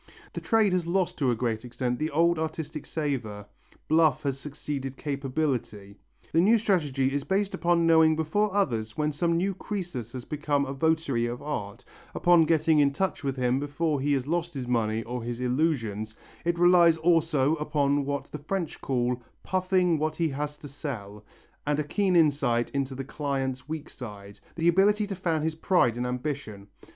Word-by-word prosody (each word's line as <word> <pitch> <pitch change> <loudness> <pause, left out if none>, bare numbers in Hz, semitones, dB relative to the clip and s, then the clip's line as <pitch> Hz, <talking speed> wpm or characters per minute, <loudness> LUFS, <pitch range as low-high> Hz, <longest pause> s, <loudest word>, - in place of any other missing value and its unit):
The - - -5
trade 220 -4 +3
has 180 -2 0
lost 180 +1 0
to 135 -4 +2
a 120 - +2
great 115 -2 -2
extent 125 0 -3
the 155 - -1
old 170 +2 +2
artistic 155 -1 -4
savour, 120 -10 -3 0.4
bluff 155 -3 +3
has 135 -1 -2
succeeded 140 -1 -5
capability. 135 -8 -3 0.4
The 165 - +4
new 220 +6 +5
strategy 145 -11 +1
is 145 -1 -1
based 195 +3 0
upon 170 -1 +2
knowing 160 -1 +5
before 175 +7 0
others 115 - -1
when 150 0 +1
some 165 +3 0
new 195 +3 0
Crœsus 175 - -5
has 125 -1 -6
become 145 -1 0
a 135 - -4
votary 140 -5 +1
of 120 +2 -5
art, 105 -9 -5 0.3
upon 175 -2 +5
getting 160 -1 +3
in 140 -1 +4
touch 190 +3 -2
with 135 -1 -1
him 125 +1 +1
before 145 0 -1
he 145 +1 +1
has 135 -2 0
lost 170 +1 -2
his 130 -3 -4
money 115 -2 0
or 125 +2 -5
his 120 +1 -5
illusions; 125 -6 -1 0.3
it 170 0 +1
relies 175 -1 +6
also 160 -4 +2
upon 145 -2 +1
what 140 0 -4
the 150 - -6
French 170 +2 -4
call 125 -1 -1 0.2
"puffing 185 -3 +1
what 155 +1 -1
he 165 0 0
has 150 +1 -4
to 145 - -10
sell," 110 -8 -7 0.4
and 150 -1 +2
a - - +1
keen 185 +5 0
insight 140 -7 +2
into 135 -1 -2
the 135 - -4
client's 135 -2 -3
weak 155 -1 -4
side, 100 -4 -10 0.2
the 170 0 0
ability 205 +4 +4
to 200 -1 -5
fan 165 -4 -1
his 160 0 0
pride 160 - +2
and 125 +1 -2
ambition. 125 -6 -5
145 Hz, 180 wpm, -27 LUFS, 125-165 Hz, 0.4 s, relies